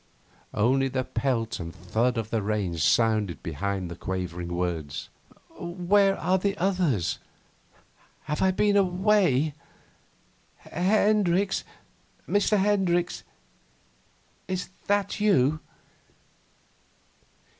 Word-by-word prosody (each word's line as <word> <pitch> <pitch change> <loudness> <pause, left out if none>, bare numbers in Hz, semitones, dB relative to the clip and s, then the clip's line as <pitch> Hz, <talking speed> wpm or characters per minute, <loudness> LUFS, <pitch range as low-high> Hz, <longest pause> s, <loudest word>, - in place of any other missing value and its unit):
Only 130 +5 +3
the 130 0 -1
pelt 115 -2 -1
and 85 0 -7
thud 110 +8 0
of 110 -1 -3
the 115 - 0
rain 100 -4 -1
sounded 105 0 +2
behind 95 +3 -3
the 85 - -7
quavering 90 -1 -4
words. 85 -4 -3 0.5
'Where 195 +3 +2
are 185 +3 +1
the 200 +2 -1
others? 175 - 0 1.0
Have 150 0 -3
I 190 - +4
been 205 +2 +2
away? 185 -6 +3 1.0
Hendricks 200 0 +1 0.6
Mr. 205 +1 +2
Hendricks 190 -3 +1 1.3
is 185 -1 -3 0.2
that 205 +1 0
you 155 -8 +3
150 Hz, 90 wpm, -26 LUFS, -, 1.3 s, I